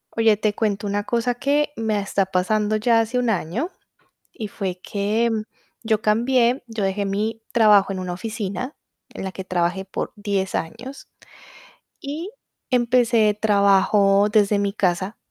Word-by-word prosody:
Oye, 225 -2 +4
te 210 0 0
cuento 205 -2 -1
una 205 0 -1
cosa, 240 +1 0
que 290 +3 +1
me 220 -4 -1
está 200 -1 0
pasando, 210 +3 0
ya 225 +1 +3
hace 225 +3 -1
1 245 -2 +1
año, 220 - -2 0.6
y 215 - -6
fue 185 -2 -4
que 215 +3 0 0.5
yo 220 -1 +1
cambié, 240 +3 +2
yo 225 -3 -5
dejé 195 +1 0
mi 215 +3 -2
trabajo, 210 -4 +5
en 190 - -4
una 180 -1 -4
oficina 215 +5 -5 0.4
en - - -8
la 190 - -3
que 190 0 -8
trabajé 180 +1 -1
por 190 - -5
10 200 -2 -2
años, 245 +11 -6 0.9
y 315 +8 -6 0.4
empecé 235 -4 +3
trabajo 200 -1 +4
desde 205 -1 +3
mi 200 0 0
casa. 190 0 -1
210 Hz, 150 wpm, -22 LUFS, 195-230 Hz, 0.9 s, trabajo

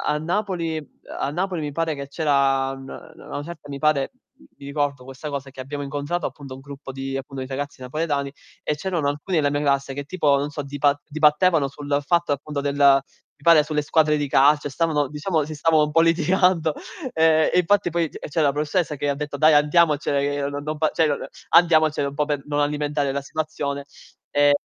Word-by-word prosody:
a - - 0
Napoli 170 -1 -2 0.4
a 140 - -1
Napoli 180 +2 -2
mi 150 -1 -3
pare 165 +1 -1
che 140 -1 -6
c'era 140 -3 +1
n 135 0 -10
na 160 +3 -11
a - - -13
una 145 - -5
certa, 155 -3 -10
mi 140 - -5
pare 150 -2 +1 0.2
mi 100 - -17
ricordo 140 -2 -2
questa 135 +3 -8
cosa 140 -1 -5
che 130 - -15
abbiamo 145 +2 -5
incontrato, 145 +4 -3
appunto, 135 0 -7
un - - -11
gruppo 140 0 -9
di 135 0 -5
appunto, 135 0 -5
di - - -8
ragazzi 140 0 -5
napoletani 140 +1 -2 0.3
e 150 - -1
c'erano 170 -2 -2
alcuni 150 +5 -2
della 145 -2 +2
mia 145 - -1
classe 140 -1 0
che 145 +1 -5
tipo 150 -4 +2
non 145 +1 -2
so 145 -1 -5
dipa 145 +1 +1
dibattevano 155 0 +3
sul 145 +1 -2
fatto, 170 +1 +1
appunto, 145 +1 -3
del 140 0 -2 0.6
mi - - -32
pare 165 -3 +6
sulle 150 0 -1
squadre 155 0 +2
di 145 -1 -1
calcio 145 +2 +4
e - - -6
stavano 150 -1 0
diciamo 150 +2 -1
si 155 - -7
stavano 155 0 +3
un 150 - -1
po' 165 - +4
litigando, 170 0 +2 0.4
ehm, 160 -1 +4
e - - +3
infatti 190 +1 +2
poi 170 -2 0
c - - -10
c'era 150 -1 +2
la - - +3
professoressa 150 +2 -1
che 145 - -3
ha 140 - 0
detto: 145 -1 -5
"Dai 155 +2 +5
andiamocene 150 -1 +3
che 145 0 -1
n 145 0 -5
non 155 0 -4
fa 155 0 +2
cioè 160 -2 +3 0.4
andiamocene 155 -4 +4
un - - -11
po' 150 - +1
per 145 -2 -2
non 145 0 -1
alimentare 145 -1 0
la 140 +1 -2
situazione". 140 -1 -4 0.5
Ehm, 145 0 +4
145 Hz, 210 wpm, -23 LUFS, 140-160 Hz, 0.6 s, pare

